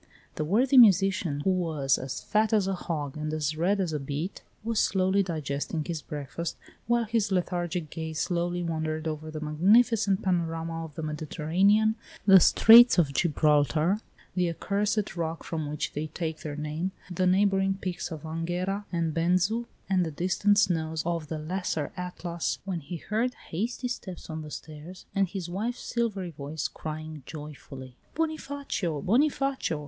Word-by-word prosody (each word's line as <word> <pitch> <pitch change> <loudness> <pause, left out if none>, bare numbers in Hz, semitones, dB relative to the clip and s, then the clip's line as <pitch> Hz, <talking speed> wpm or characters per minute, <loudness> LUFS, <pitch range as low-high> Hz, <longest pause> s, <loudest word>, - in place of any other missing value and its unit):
The 155 - -2
worthy 250 - +4
musician, 195 -8 +4
who 190 - +2
was 160 -7 +1
as 130 -1 -5
fat 215 +1 +1
as 210 -3 +3
a 195 - 0
hog 155 -6 -4
and 155 0 -3
as 155 -1 -1
red 185 +6 +1
as 175 -5 -1
a 150 - -1
beet, 145 +7 -4 0.2
was 230 -1 0
slowly 190 +1 +2
digesting 155 -3 -3
his 165 -4 -3
breakfast, 145 +3 -5 0.3
while 240 0 +3
his 220 -2 0
lethargic 175 -3 -1
gaze 160 -1 -4
slowly 175 0 -1
wandered 160 -1 -2
over 155 0 -4
the 155 0 -5
magnificent 195 +6 +3
panorama 165 -2 -1
of 150 -3 -12
the 160 - -5
Mediterranean, 175 +8 +2 0.3
the 195 -2 +9
Straits 230 +6 +8
of 150 -5 +3
Gibraltar, 150 +3 +2 0.3
the 180 -1 +1
accursed 205 +3 -1
rock 165 -1 -3
from 155 -3 -3
which 150 0 -3
they 150 +2 -3
take 160 0 -4
their 150 -2 -5
name, 155 +5 -3 0.2
the 185 +1 +1
neighboring 195 0 +3
peaks 185 -3 -4
of 160 -4 -7
Anghera 175 +5 -2
and 165 -3 0
Benzu, 185 +8 +1 0.2
and 190 -2 +2
the 165 - -2
distant 185 +6 +1
snows 160 -5 +1
of 170 -2 -2
the 160 - -4
Lesser 160 -2 -2
Atlas 180 -2 -3
when 185 -3 -2
he 170 +3 -6
heard 225 +8 -1
hasty 235 +8 -2
steps 185 -9 -6
on 160 0 -4
the 150 - -8
stairs 155 +4 -9
and 195 -1 +2
his 185 -1 -5
wife's 215 +8 -3
silvery 205 -7 -2
voice 150 +1 -4
crying 155 -1 -7
joyfully: 140 -4 -9 0.2
"Bonifacio! 285 - -2
Bonifacio! 270 - +1
175 Hz, 160 wpm, -28 LUFS, 155-195 Hz, 0.3 s, the